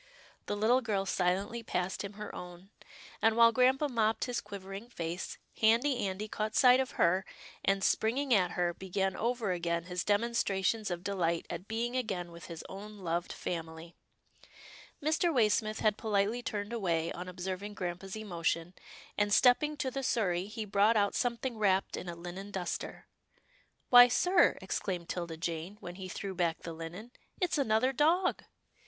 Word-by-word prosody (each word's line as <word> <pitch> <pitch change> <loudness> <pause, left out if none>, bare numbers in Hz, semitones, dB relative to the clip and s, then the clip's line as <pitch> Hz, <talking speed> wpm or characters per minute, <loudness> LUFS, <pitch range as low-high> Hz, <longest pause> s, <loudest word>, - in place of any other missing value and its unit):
" - - -28
The 205 - -2
little 235 +5 +3
girl 205 -5 -1
silently 195 +5 0
passed 185 -4 -2
him 200 0 -6
her 210 0 -7
own, 180 +2 -10 0.5
and 225 0 +3
while 230 0 +8
grampa 260 +4 +3
mopped 225 -4 +1
his 245 -1 -2
quivering 200 +2 -8
face, 170 -4 -5 0.2
Handy 235 +1 +3
Andy 190 +3 -4
caught 215 0 -3
sight 250 -1 +7
of 260 -1 -1
her, 185 +3 +3 0.4
and, 195 0 +2
springing 255 +7 +2
at 180 -4 +3
her, 175 -1 0
began 190 +1 -2
over 235 -3 -1
again 170 -1 -1
his 180 0 -3
demonstrations 210 -1 +1
of 175 0 -4
delight 170 -4 0
at 175 +3 -6
being 235 +3 -2
again 190 -9 -2
with 170 0 -11
his 165 -2 -8
own 210 +2 -9
loved 175 -2 -2
family. 165 0 -5 1.1
Mr. 315 +3 +2
Waysmith 215 -4 +2
had 215 -1 +2
politely 215 +2 +1
turned 205 -1 -4
away 170 -7 0
on 180 +1 -6
ob 180 0 -11
serving 190 +3 -4
grampa's 185 +1 -5
emotion, 170 -4 -2 0.5
and, 205 0 +2
stepping 295 +7 +4
to 260 -1 -2
the 275 - -3
sur 225 -6 +1
rey, 175 +1 -1
he 215 +1 -5
brought 210 +2 +3
out 200 -1 +2
something 240 -1 -1
wrapped 195 -2 +2
in 180 - -6
a 170 - -5
linen 180 +4 -7
duster. 190 -3 -4 0.4
" - - -36
Why, 245 0 +11
sir," 355 +8 +3
exclaimed 180 -2 -3
'Tilda 170 -2 -4
Jane 170 +4 -4
when 175 - -7
he 185 0 -8
threw 195 +1 -5
back 175 -2 -1
the 165 - -5
linen, 170 +8 -8 0.3
it's 355 -4 +1
another 255 +1 +2
dog." 340 +7 +2
200 Hz, 170 wpm, -32 LUFS, 180-230 Hz, 1.1 s, Why